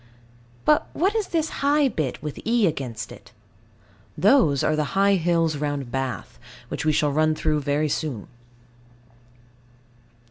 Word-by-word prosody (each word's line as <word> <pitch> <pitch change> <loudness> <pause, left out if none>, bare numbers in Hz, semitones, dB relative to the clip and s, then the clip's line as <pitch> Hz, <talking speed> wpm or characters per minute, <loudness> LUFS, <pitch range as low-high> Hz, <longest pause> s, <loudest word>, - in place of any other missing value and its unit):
But 300 - +3
what 380 +5 +1
is 435 -3 0
this 320 -2 -1
high 285 +1 +3
bit 155 - -3
with 150 -2 -5
E 230 -1 +2
against 135 - -3
it? - - -14 0.9
Those 165 - +4
are 155 - +2
the 155 +4 -2
high 200 0 +4
hills 165 -3 +1
round 145 -4 -3
Bath, 130 - -4 0.3
which - - -4
we 155 - +4
shall 150 -1 +1
run 155 +2 +2
through 155 -1 0 0.3
soon. 140 -8 -3
155 Hz, 135 wpm, -24 LUFS, 145-210 Hz, 0.9 s, Those